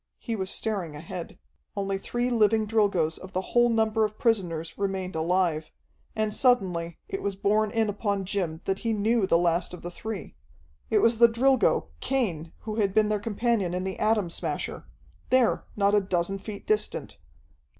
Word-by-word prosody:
He 230 Hz, -, -4 dB
was 190 Hz, -3 st, -3 dB
staring 195 Hz, -10 st, -3 dB
ahead. 165 Hz, +3 st, -7 dB, 0.4 s
Only 195 Hz, -1 st, -1 dB
three 240 Hz, +5 st, -2 dB
living 220 Hz, -1 st, +3 dB
Drilgoes 200 Hz, -7 st, +1 dB
of 190 Hz, +1 st, -11 dB
the 185 Hz, -, 0 dB
whole 240 Hz, 0 st, +5 dB
number 220 Hz, -1 st, +2 dB
of 215 Hz, 0 st, -2 dB
prisoners 175 Hz, -9 st, 0 dB
remained 190 Hz, -3 st, -2 dB
alive, 160 Hz, -1 st, +1 dB, 0.5 s
and 215 Hz, -1 st, 0 dB
suddenly 180 Hz, -11 st, +1 dB
it 390 Hz, -, -4 dB
was 200 Hz, -1 st, -2 dB
borne 210 Hz, +2 st, +2 dB
in 225 Hz, 0 st, +1 dB
upon 200 Hz, -1 st, -1 dB
Jim 180 Hz, -4 st, -2 dB
that 195 Hz, 0 st, -1 dB
he 230 Hz, -1 st, -1 dB
knew 215 Hz, 0 st, +2 dB
the 170 Hz, -, +4 dB
last 170 Hz, +1 st, +1 dB
of -, -, -14 dB
the 175 Hz, -, -5 dB
three. 220 Hz, +2 st, -6 dB, 0.6 s
It -, -, +3 dB
was 230 Hz, -1 st, +3 dB
the 235 Hz, -1 st, +8 dB
Drilgo, 235 Hz, -, +2 dB
Cain, 175 Hz, -, -1 dB
who 215 Hz, -1 st, -5 dB
had 200 Hz, -3 st, +1 dB
been 215 Hz, -1 st, +4 dB
their 210 Hz, -1 st, +1 dB
companion 210 Hz, -3 st, 0 dB
in 180 Hz, -, -2 dB
the 190 Hz, 0 st, -4 dB
Atom 215 Hz, -5 st, +2 dB
Smasher -, -, -4 dB, 0.4 s
there, 255 Hz, -2 st, +3 dB
not 200 Hz, -1 st, +2 dB
a 205 Hz, -, +5 dB
dozen 190 Hz, 0 st, -1 dB
feet 200 Hz, +1 st, -8 dB
distant. 430 Hz, 0 st, -1 dB
200 Hz, 175 wpm, -27 LUFS, 180-225 Hz, 0.6 s, the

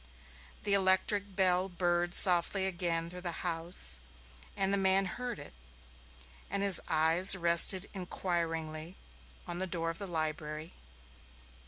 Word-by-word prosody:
The 200 Hz, -, -1 dB
electric 195 Hz, +1 st, 0 dB
bell 185 Hz, 0 st, 0 dB
burred 175 Hz, -1 st, -2 dB
softly 185 Hz, +1 st, +5 dB
again 170 Hz, -3 st, -3 dB
through 180 Hz, +1 st, -11 dB
the 175 Hz, 0 st, -7 dB
house, 165 Hz, -, 0 dB, 0.6 s
and 195 Hz, 0 st, -1 dB
the -, -, +3 dB
man 195 Hz, 0 st, 0 dB
heard 245 Hz, +6 st, -7 dB
it, 145 Hz, -, -13 dB, 1.0 s
and 200 Hz, +2 st, -4 dB
his 195 Hz, -3 st, +5 dB
eyes 165 Hz, +5 st, +4 dB
rested 175 Hz, +2 st, +4 dB
inquiringly 170 Hz, -3 st, -6 dB, 0.5 s
on 175 Hz, 0 st, -7 dB
the 190 Hz, -, -4 dB
door 165 Hz, -2 st, -4 dB
of 165 Hz, -, -12 dB
the 200 Hz, -, -8 dB
library. 155 Hz, -1 st, -6 dB
175 Hz, 130 wpm, -30 LUFS, 165-190 Hz, 1.0 s, softly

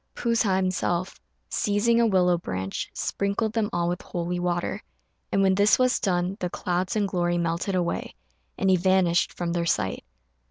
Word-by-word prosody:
P'u 235 Hz, -1 st, 0 dB
sa 205 Hz, -4 st, +2 dB
himself, 185 Hz, -1 st, -1 dB, 0.3 s
seizing 230 Hz, +3 st, +2 dB
a 230 Hz, -, +4 dB
willow 180 Hz, -3 st, +3 dB
branch, 95 Hz, -, -4 dB
sprinkled 200 Hz, +2 st, -2 dB
them 220 Hz, -2 st, 0 dB
all 170 Hz, 0 st, 0 dB
with 175 Hz, +1 st, -2 dB
holy 175 Hz, 0 st, -3 dB
water; 175 Hz, -1 st, -2 dB, 0.5 s
and 195 Hz, -, +2 dB
when 190 Hz, -1 st, +4 dB
this 205 Hz, +2 st, +4 dB
was 255 Hz, -1 st, +2 dB
done 180 Hz, 0 st, 0 dB
the 180 Hz, -, -2 dB
clouds 180 Hz, +2 st, -2 dB
and 210 Hz, -2 st, +1 dB
glory 175 Hz, -2 st, 0 dB
melted 170 Hz, +3 st, -1 dB
away, 175 Hz, -, -2 dB, 0.4 s
and 190 Hz, -1 st, +2 dB
he 185 Hz, -, +5 dB
vanished 180 Hz, -1 st, +2 dB
from 170 Hz, -1 st, -3 dB
their 170 Hz, -1 st, -1 dB
sight. 95 Hz, -, -1 dB
185 Hz, 170 wpm, -25 LUFS, 175-200 Hz, 0.5 s, he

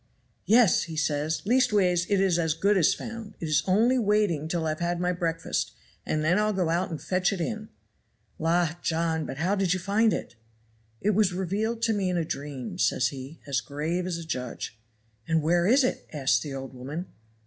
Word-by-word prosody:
"'Yes!' 220 Hz, -6 st, +5 dB
says 155 Hz, 0 st, 0 dB
he; 200 Hz, -, -5 dB
'leastways, 190 Hz, -8 st, +3 dB
it 200 Hz, -2 st, +3 dB
is 190 Hz, -3 st, +2 dB
as 160 Hz, -2 st, +1 dB
good 200 Hz, +5 st, +2 dB
as 175 Hz, -5 st, +4 dB
found; 225 Hz, -3 st, -6 dB
it 165 Hz, -, -4 dB
is 155 Hz, -2 st, +3 dB
only 230 Hz, +7 st, +3 dB
waiting 205 Hz, -8 st, +1 dB
till 165 Hz, 0 st, -1 dB
I've 155 Hz, 0 st, -2 dB
had 175 Hz, 0 st, -1 dB
my 180 Hz, 0 st, +1 dB
breakfast, 165 Hz, -2 st, -2 dB, 0.3 s
and 155 Hz, 0 st, 0 dB
then 175 Hz, +6 st, +3 dB
I'll 215 Hz, 0 st, +1 dB
go 185 Hz, -4 st, 0 dB
out 170 Hz, +3 st, 0 dB
and 160 Hz, -, -5 dB
fetch 185 Hz, +1 st, 0 dB
it 195 Hz, -, -3 dB
in.' 215 Hz, +5 st, -3 dB, 0.7 s
"'La, 165 Hz, 0 st, +2 dB
John, 160 Hz, -1 st, 0 dB
but 135 Hz, -, -6 dB
how 175 Hz, +6 st, +1 dB
did 190 Hz, -3 st, +1 dB
you -, -, -2 dB
find 210 Hz, +4 st, +2 dB
it?' -, -, -4 dB, 0.7 s
"'It 210 Hz, -, +2 dB
was 205 Hz, -2 st, +2 dB
revealed 210 Hz, +5 st, -2 dB
to 225 Hz, -, +3 dB
me 195 Hz, -3 st, 0 dB
in 180 Hz, -, 0 dB
a 165 Hz, -, 0 dB
dream,' 140 Hz, -5 st, -5 dB
says -, -, +2 dB
he, 135 Hz, +3 st, -9 dB
as 135 Hz, -4 st, 0 dB
grave 155 Hz, +8 st, -3 dB
as 175 Hz, -2 st, -2 dB
a 170 Hz, -, -6 dB
judge. 125 Hz, -7 st, -4 dB, 0.5 s
"'And 160 Hz, -1 st, +1 dB
where 175 Hz, +2 st, +3 dB
is 260 Hz, +5 st, +5 dB
it?' 255 Hz, -, -2 dB
asks 135 Hz, -7 st, +2 dB
the 140 Hz, +2 st, -6 dB
old 135 Hz, 0 st, -7 dB
woman. 140 Hz, +8 st, -5 dB
175 Hz, 205 wpm, -27 LUFS, 155-200 Hz, 0.7 s, Yes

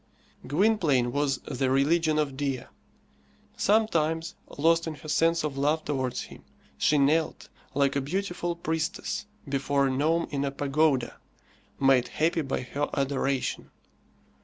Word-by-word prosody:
Gwynplaine 150 Hz, -, +2 dB
was 140 Hz, 0 st, 0 dB
the 130 Hz, +1 st, -1 dB
religion 155 Hz, +4 st, +2 dB
of 145 Hz, -3 st, 0 dB
Dea. 135 Hz, -2 st, -2 dB, 0.9 s
Sometimes, 165 Hz, -7 st, +1 dB, 0.2 s
lost 165 Hz, +3 st, +3 dB
in 160 Hz, -, -4 dB
her 150 Hz, -, -12 dB
sense 165 Hz, +2 st, +2 dB
of 140 Hz, -3 st, -3 dB
love 150 Hz, +3 st, +1 dB
towards 130 Hz, -4 st, -2 dB
him, -, -, -13 dB, 0.3 s
she 150 Hz, -, +2 dB
knelt, 150 Hz, +3 st, +1 dB, 0.3 s
like 140 Hz, 0 st, +2 dB
a 140 Hz, -, +1 dB
beautiful 175 Hz, +2 st, -2 dB
priestess 160 Hz, +4 st, -3 dB, 0.2 s
before 140 Hz, 0 st, +1 dB
a 135 Hz, -, +1 dB
gnome 155 Hz, +5 st, +1 dB
in 140 Hz, -1 st, -1 dB
a 140 Hz, -, 0 dB
pagoda, 140 Hz, -1 st, +1 dB, 0.6 s
made 135 Hz, -2 st, +4 dB
happy 165 Hz, +1 st, 0 dB
by 135 Hz, -3 st, -2 dB
her 140 Hz, +3 st, -3 dB
adoration. 135 Hz, -1 st, -1 dB
145 Hz, 135 wpm, -27 LUFS, 135-165 Hz, 0.9 s, made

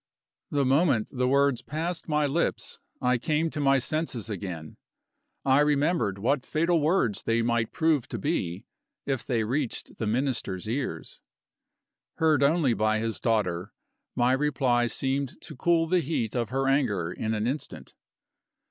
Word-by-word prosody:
The 140 Hz, -2 st, +1 dB
moment 135 Hz, -4 st, +2 dB
the 125 Hz, -1 st, 0 dB
words 140 Hz, -1 st, +3 dB
had -, -, -35 dB
passed 165 Hz, +3 st, -3 dB
my 150 Hz, -1 st, +2 dB
lips, 150 Hz, +5 st, -1 dB, 0.2 s
I 125 Hz, 0 st, +2 dB
came 155 Hz, +5 st, 0 dB
to 155 Hz, -, -4 dB
my 135 Hz, -1 st, +4 dB
senses 130 Hz, -5 st, -2 dB
again; 90 Hz, -6 st, -6 dB, 0.7 s
I 135 Hz, +1 st, +5 dB
remembered 145 Hz, -, +2 dB
what 130 Hz, +6 st, 0 dB
fatal 165 Hz, +3 st, +1 dB
words 150 Hz, -, +1 dB
they 115 Hz, 0 st, +1 dB
might 115 Hz, -1 st, 0 dB
prove 160 Hz, -6 st, +1 dB
to 120 Hz, -, -5 dB
be, 90 Hz, -2 st, -2 dB, 0.4 s
if 135 Hz, -4 st, -1 dB
they 115 Hz, -3 st, 0 dB
reached 125 Hz, +3 st, -3 dB
the 110 Hz, -, -1 dB
Minister's 110 Hz, -5 st, -1 dB
ears. 130 Hz, +4 st, -4 dB, 0.9 s
Heard 155 Hz, -3 st, +3 dB
only 140 Hz, -2 st, +3 dB
by 110 Hz, 0 st, +1 dB
his 115 Hz, 0 st, -2 dB
daughter, 100 Hz, -5 st, 0 dB, 0.4 s
my 120 Hz, +1 st, +3 dB
reply 130 Hz, -4 st, +2 dB
seemed 135 Hz, +2 st, -2 dB
to 155 Hz, -, -9 dB
cool 165 Hz, +4 st, +2 dB
the 180 Hz, +2 st, +2 dB
heat 135 Hz, -8 st, -2 dB
of 120 Hz, -2 st, -1 dB
her 135 Hz, +2 st, 0 dB
anger 105 Hz, -, +1 dB
in 110 Hz, +4 st, -2 dB
an 105 Hz, 0 st, -1 dB
instant. 135 Hz, +5 st, -4 dB
130 Hz, 155 wpm, -27 LUFS, 115-150 Hz, 0.9 s, I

